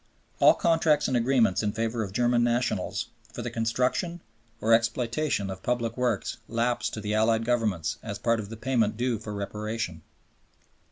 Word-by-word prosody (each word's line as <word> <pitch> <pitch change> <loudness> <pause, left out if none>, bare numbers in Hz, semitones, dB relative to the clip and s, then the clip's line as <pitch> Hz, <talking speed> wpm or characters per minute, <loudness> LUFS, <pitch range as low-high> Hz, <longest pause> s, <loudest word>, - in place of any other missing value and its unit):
" - - -37
All - - +8
contracts 160 -3 +3
and 130 - 0
agreements 120 -5 +3
in 105 -1 -1
favor 115 0 -1
of 100 -3 -3
German 120 +2 +2
nationals 120 -5 0 0.2
for - - -6
the - - -4
construction 125 +10 0 0.4
or 115 +1 +3
exploitation 115 -1 +1
of 95 0 -8
public 120 -2 -1
works 125 -1 -1
lapse 120 +1 0
to - - -6
the 105 0 -2
Allied 110 +1 +2
Governments 110 -9 0
as - - -5
part 115 -1 +1
of 100 -2 -6
the 115 - -7
payment 115 -3 +1
due 120 -2 0
for 110 0 -7
Reparation. 105 -3 -4
115 Hz, 170 wpm, -27 LUFS, 110-125 Hz, 0.4 s, All